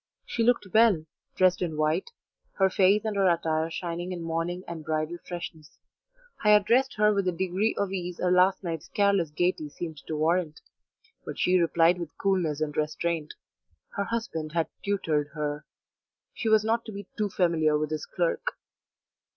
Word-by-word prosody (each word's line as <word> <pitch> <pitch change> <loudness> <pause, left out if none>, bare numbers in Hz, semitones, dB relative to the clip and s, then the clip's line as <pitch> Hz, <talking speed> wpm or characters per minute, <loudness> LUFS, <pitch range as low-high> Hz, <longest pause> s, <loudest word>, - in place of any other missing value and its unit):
She 235 - -3
looked 240 -1 +3
well, 215 -8 +5 0.3
dressed 185 -1 +3
in 165 -4 -2
white, 155 +4 0 0.4
her 190 -1 +2
face 200 +3 +3
and 215 -1 -1
her 195 -2 +4
attire 160 -1 0
shining 175 +1 -4
in 175 -2 -5
morning 165 +2 -2
and 165 -2 -6
bridal 155 +2 -2
freshness. 170 -3 -8 0.7
I 210 -1 +6
addressed 240 +6 +3
her 210 0 +4
with 200 -1 0
the 180 - +2
degree 190 +5 0
of 200 -2 -1
ease 180 -2 -4
her 180 - 0
last 185 +2 +4
night's 165 -4 -4
careless 200 -5 +2
gaiety 155 0 -1
seemed 160 +1 -6
to 160 - -3
warrant, 160 0 0 0.6
but - - -7
she 185 0 +3
replied 170 +1 +3
with 165 -4 -7
coolness 175 -7 0
and 150 -1 -2
restraint: 155 +1 -2 0.5
her 200 - -3
husband 180 -10 -3
had 165 -1 0
tutored 160 -8 0
her; 150 0 -3 0.7
she 225 - -2
was 220 -1 +5
not 230 +1 +1
to 220 - -7
be 200 -1 -7
too 210 -1 -1
familiar 165 -5 +2
with 155 0 -2
his 155 -1 -3
clerk. 175 -2 -1
175 Hz, 170 wpm, -27 LUFS, 160-195 Hz, 0.7 s, I